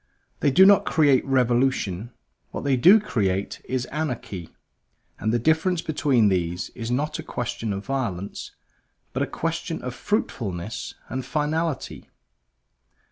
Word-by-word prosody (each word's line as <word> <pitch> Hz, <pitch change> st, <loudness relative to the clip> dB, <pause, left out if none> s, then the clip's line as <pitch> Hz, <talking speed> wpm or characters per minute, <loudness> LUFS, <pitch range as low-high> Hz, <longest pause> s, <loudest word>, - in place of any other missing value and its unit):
They 145 Hz, -, +3 dB
do 185 Hz, +8 st, +7 dB
not 200 Hz, 0 st, +7 dB
create 145 Hz, -5 st, +4 dB
revolution; 120 Hz, -5 st, +1 dB, 0.4 s
what -, -, -6 dB
they 140 Hz, -2 st, +2 dB
do 180 Hz, -, +7 dB
create 100 Hz, -, -1 dB
is 130 Hz, -1 st, -2 dB
anarchy; 125 Hz, -, -4 dB, 0.7 s
and 110 Hz, -, 0 dB
the 120 Hz, -, +2 dB
difference 160 Hz, -, +1 dB
between 140 Hz, -7 st, +2 dB
these 90 Hz, -1 st, -1 dB
is 115 Hz, -2 st, -5 dB
not 150 Hz, +5 st, -1 dB
a -, -, -2 dB
question 120 Hz, -2 st, -4 dB
of 100 Hz, 0 st, -4 dB
violence, 105 Hz, -9 st, -3 dB, 0.6 s
but -, -, -1 dB
a -, -, +1 dB
question -, -, -3 dB
of -, -, -4 dB
fruitfulness 100 Hz, +4 st, -3 dB
and 130 Hz, 0 st, -4 dB
finality. 150 Hz, +2 st, -2 dB
125 Hz, 135 wpm, -24 LUFS, 105-150 Hz, 0.7 s, do